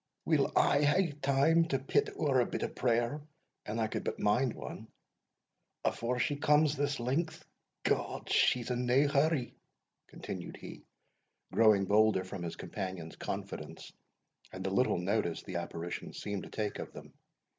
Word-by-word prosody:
"We'll - - +2
aye 140 - +4
hae 165 +4 +3
time 140 +5 +4
to 140 -5 0
pit 135 +1 +1
ower 140 -4 +2
a 120 - +3
bit - - -3
prayer 120 +4 +1 0.5
(an 105 - -3
I 115 - +1
could 110 - -3
but - - -3
mind 120 +4 +2
ane) - - -8 1.0
afore 120 +2 0
she 145 +3 0
comes 150 +1 +4
this 145 -1 -1
length 140 +7 -2 0.4
God! - - -1
she's 125 0 +3
in 125 0 -1
nae 130 +4 +4
hurry," 140 -2 +1 0.5
continued - - -7
he, - - -10 0.7
growing 110 -3 +5
bolder 105 -1 +4
from 95 0 -7
his 85 -1 -4
companion's 95 -3 -6
confidence, - - -6 0.6
and 95 - -6
the 95 - -1
little 125 +2 +2
notice 90 -1 -1
the 90 - -4
apparition 85 0 -5
seemed 100 -2 -4
to - - -11
take 105 -2 -3
of - - -7
them. - - -11
120 Hz, 155 wpm, -32 LUFS, 100-140 Hz, 1.0 s, growing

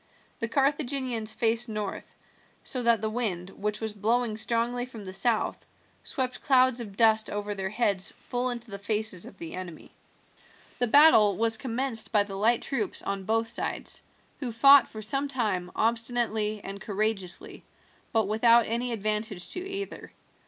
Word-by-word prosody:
The 230 - -1
Carthaginians 265 -4 0
faced 230 +1 0
north, 210 -2 -5 0.5
so 255 - 0
that 235 -2 +4
the 220 - -1
wind, 195 -6 0
which 210 +2 -1
was 220 -1 -3
blowing 225 +2 0
strongly 235 +2 0
from 225 -5 -10
the 185 - -7
south, 220 +3 0 0.3
swept 260 -3 -4
clouds 260 -2 +3
of 205 -4 -8
dust 220 -1 +4
over 205 0 -4
their 190 -1 -4
heads 200 -3 0
full 245 +1 -4
into 240 -2 -7
the 200 - -6
faces 210 -3 -2
of 195 - -14
the 165 -2 -8
enemy. 180 -3 -8 0.9
The 245 - +1
battle 220 - +6
was 225 0 +4
commenced 245 0 -1
by 210 -2 +4
the 200 -1 -9
light 220 +4 +2
troops 235 -7 -2
on 195 -1 -4
both 225 +2 0
sides, - - -2 0.4
who 255 -4 -4
fought 275 +4 +7
for 215 0 -8
some 275 +6 +2
time 210 -10 -2
obstinately 225 -2 0
and 195 0 -7
courageously, 205 -3 -2 0.5
but 220 -3 +1
without 230 +2 +4
any 235 +2 -1
advantage 210 -3 -2
to - - 0
either. 390 +1 -6
225 Hz, 160 wpm, -27 LUFS, 205-245 Hz, 0.9 s, fought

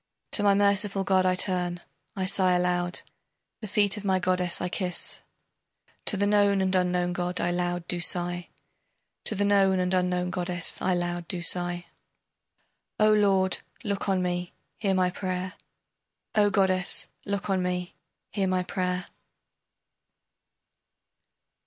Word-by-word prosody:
To - - +4
my 200 -1 +4
merciful 200 0 +2
god 190 -1 +3
I 185 - +3
turn, 180 -2 +1 0.4
I 190 -2 -1
sigh 185 -1 +3
aloud, 180 0 +1 0.6
The 215 - -6
feet 205 +1 +2
of 205 - -6
my 190 -2 +2
goddess 180 -1 +1
I 180 - -1
kiss 180 -1 -3 0.4
[.] - - -39
To 205 - +2
the 200 - +2
known 205 -1 +3
and 190 0 +1
unknown 180 -1 +1
god 180 0 -2
I 175 - 0
loud 175 0 -2
do 175 - -2
sigh, 175 0 -1 0.8
To 215 - +2
the 205 +1 +1
known 195 -2 +4
and 180 0 0
unknown 180 -1 +1
goddess 175 -1 -3
I 185 -1 +2
loud 175 -1 -2
do 175 -2 -2
sigh, 175 0 0 1.1
O 215 0 +5
lord, 195 -3 +3 0.2
look 200 -2 -2
on 185 -1 +2
me, 175 0 -2 0.3
hear 195 -3 +1
my 180 -1 +2
prayer, 185 0 -3 0.8
O 205 -1 +4
goddess, 190 -3 +1 0.2
look 200 0 -3
on 190 -1 +1
me, 180 0 -2 0.4
hear 195 -3 0
my 185 -1 +1
prayer. 180 0 -2
185 Hz, 145 wpm, -27 LUFS, 180-195 Hz, 1.1 s, O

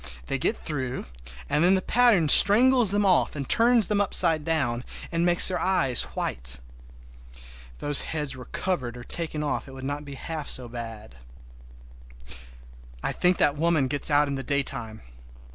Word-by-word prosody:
They - - -3
get - - -1
through, 130 -4 -5 0.4
and 150 - 0
then 185 +2 +4
the 190 - -1
pattern 235 -9 +3
strangles 240 - +6
them 205 +1 +2
off 185 -4 +2
and 140 -3 -5
turns 235 -1 +4
them 205 +2 0
upside 165 -5 +1
down, 135 -7 -2 0.3
and 165 0 -1
makes 175 0 +4
their 185 -1 -1
eyes 160 -10 +1
white! 60 +1 -3 0.8
If - - -14 0.4
those 145 - -1
heads 150 -4 -4
were 125 -1 -10
covered 130 -11 -4
or 120 - -10
taken 155 +1 -3
off 145 - -3
it 135 - -12
would 130 0 -10
not 145 +1 -4
be 140 -1 -9
half 155 +1 -6
so 125 -2 -2
bad. 115 - -9 1.9
I - - 0
think 180 0 +1
that 145 - +2
woman 160 -3 +1
gets 140 +2 +2
out 145 0 +3
in 140 - -4
the 135 - -4
daytime! 120 -5 -3
150 Hz, 170 wpm, -25 LUFS, 130-180 Hz, 1.9 s, strangles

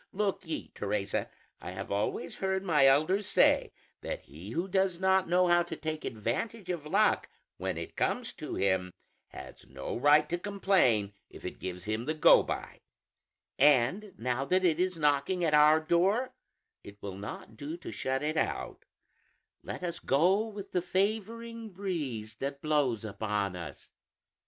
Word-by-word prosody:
Look 195 -3 -1
ye, 160 - -4
Teresa, 100 -1 -2 0.3
I - - -7
have 95 +1 -6
always 100 +1 -2
heard 190 0 -1
my 150 -7 +4
elders 155 +9 +3
say - - +4 0.3
that - - -4
he 80 +8 -11
who 170 - -2
does 190 -2 +1
not 190 -1 +3
know 180 +1 +4
how 175 0 +4
to 170 -1 -4
take 155 0 -4
advantage 180 - -3
of 160 -4 -5
luck 210 +6 +2 0.3
when - - -3
it - - -7
comes 245 -2 -1
to 155 - -6
him, 95 -2 +1 0.4
has - - -11
no 65 0 -5
right 145 +4 +5
to 175 - -1
complain 180 - +2 0.2
if - - -12
it - - -6
gives 90 -1 -6
him 110 +3 -2
the 155 +3 -1
go 155 - +7
by; - - -5 0.8
and 150 - +3
now 125 +2 -1
that 185 +6 +2
it 165 -2 +2
is 185 -1 0
knocking 150 +4 +1
at 160 -2 +2
our 150 +1 +7
door, 185 +10 +1 0.5
it 100 0 -12
will 100 -2 -5
not 100 +2 -8
do 150 +8 -6
to 175 - -8
shut 135 +1 -2
it 155 +1 -1
out; - - -2 0.8
let - - -7
us 170 -1 -3
go 185 +10 +2
with 205 -3 -8
the 180 - +1
favoring 220 +5 -2
breeze 145 - -4
that 140 +2 -4
blows 140 -8 +1
upon 105 -2 -2
us." 85 -3 -9
155 Hz, 165 wpm, -30 LUFS, 115-190 Hz, 0.8 s, go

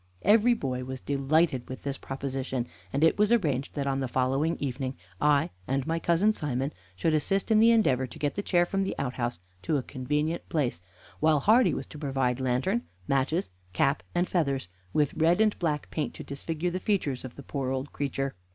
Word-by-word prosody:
Every 225 +4 +5
boy 130 - -3
was 130 +1 -5
delighted 140 -1 +1
with 130 - -7
this 140 -1 -3
proposition, 135 -2 -3 0.3
and 140 - 0
it 160 - +4
was 210 +1 +4
arranged 150 - +1
that 140 -2 -1
on 135 -1 0
the 135 - -1
following 135 +6 +1
evening 130 -1 -3 0.3
I 145 -1 +3 0.2
and 135 0 0
my 165 +1 0
cousin 170 +6 +3
Simon 140 -4 -2 0.2
should 160 - +1
assist 195 +8 +1
in 215 - +6
the 225 +1 +7
endeavor 135 - +3
to 120 - -11
get 145 -1 -1
the 205 - -2
chair 175 -3 +3
from 195 +2 0
the 190 - -2
outhouse 125 -5 -2 0.2
to 150 - +1
a 135 - -2
convenient 150 +6 -2
place, 130 - 0 0.4
while 155 -2 +3
Hardy 230 - +5
was - - -4
to 150 - -11
provide 135 -4 0
lantern, 130 - +1 0.3
matches, 140 - +1 0.2
cap, 140 +9 +2
and 175 +1 +2
feathers, 140 - 0 0.2
with 150 +4 +2
red 165 +4 +3
and 215 -1 +4
black 155 -4 -1
paint 150 -3 -2
to - - -7
disfigure 160 +4 -3
the 185 - -2
features 175 - 0
of 130 -2 -8
the 140 - -10
poor 135 -1 -3
old 130 +2 -3
creature. 135 -1 -2
145 Hz, 195 wpm, -28 LUFS, 130-170 Hz, 0.4 s, the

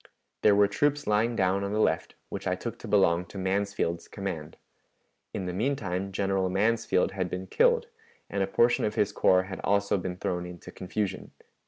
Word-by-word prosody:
There 105 - +5
were 100 0 +5
troops 145 +7 0
lying 110 +3 +2
down 95 -1 +1
on 100 +1 -2
the 105 - 0
left, - - +1
which - - -5
I - - +1
took - - -6
to - - -8
belong 90 -4 +3
to 95 - -11
Mansfield's 95 -3 -1
command. 95 -7 -5 0.7
In 95 - -4
the 90 - -3
mean 125 +10 +1
time 95 -6 -3
General 95 -1 0
Mansfield 100 0 +2
had 95 -2 -2
been 90 +2 -4
killed, 480 - +3 0.4
and 100 - -2
a 95 - +1
portion 120 +4 +3
of 105 0 -1
his 105 -2 +2
corps 95 -2 +4
had 95 0 -7
also 100 0 +2
been 90 0 -4
thrown 90 -1 -2
into 90 -1 -10
confusion." 95 +1 -4
100 Hz, 190 wpm, -28 LUFS, 95-105 Hz, 0.7 s, There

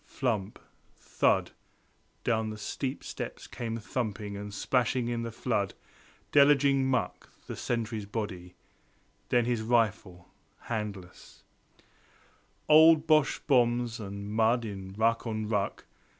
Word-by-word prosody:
flump! 110 -6 -2 0.4
thud! - - +1 0.7
down 110 -2 0
the 110 - -6
steep 130 +6 -4
steps - - -6
came 115 -2 -5
thumping 105 -3 -4
And 105 +1 -6
splashing 120 +3 0
in 120 -1 -2
the 115 0 -4
flood, 105 -5 -1 0.6
deluging 140 -2 +5
muck 125 -2 -2 0.2
The - - -6
sentry's 110 -3 -3
body; 95 -5 -5 0.7
then 120 -1 +3
his 120 -2 0
rifle, 110 -6 0 0.3
handles 105 -6 -6 0.3
Of - - -28 0.8
old 160 0 +7
Boche 155 -3 +2
bombs, 120 -3 +2
and 100 0 -6
mud 115 +2 +2
in 95 -2 -7
ruck 115 +3 +1
on 110 -1 -3
ruck. 100 -2 -2
115 Hz, 120 wpm, -29 LUFS, 105-125 Hz, 0.8 s, old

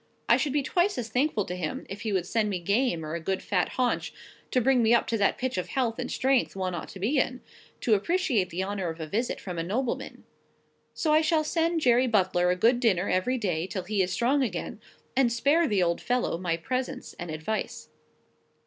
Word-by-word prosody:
I - - +6
should 295 - 0
be 290 -1 +1
twice 360 +7 +1
as 230 -2 -3
thankful 245 -3 +1
to 180 - -5
him 170 -4 -4
if 200 +1 -7
he 220 -2 -2
would 185 -3 0
send 215 +2 0
me 195 - -1
game, 200 -2 0
or 155 - -5
a 170 - -2
good 190 +3 -2
fat 180 -3 0
haunch, 250 -2 0 0.4
to 255 - +2
bring 255 0 +3
me 230 +1 +5
up 235 - +2
to 230 - +1
that 200 - +2
pitch 255 -7 -2
of 180 - -4
health 245 -4 -1
and - - -3
strength 265 -4 +1
one 185 -1 -2
ought 170 - -5
to 195 - -10
be 250 +9 +1
in, 255 0 -1 0.4
to 230 - +2
appreciate 235 - +1
the 180 +3 -2
honour 195 -2 -3
of 160 +1 -7
a 160 - -3
visit 225 +10 -2
from 180 -3 -5
a - - -1
nobleman. 230 +8 -3 0.7
So 310 -2 +1
I 310 - +5
shall 315 0 +2
send 330 +1 0
Jerry 250 -1 +4
Butler 185 -5 +2
a 180 - +2
good 235 +6 +3
dinner 200 -6 +2
every 250 +8 +1
day 180 -7 -1
till 190 -1 -4
he 200 +2 0
is 185 0 0
strong 255 +8 +2
again; 210 -3 -3 0.3
and 260 -3 +3
spare 285 +8 +3
the 205 -6 +1
poor 175 - +3
old 170 - -2
fellow 245 -7 0
my 170 -2 -1
presence 255 +10 -4
and 175 -1 -5
advice." 160 +8 -4
220 Hz, 230 wpm, -27 LUFS, 185-255 Hz, 0.7 s, I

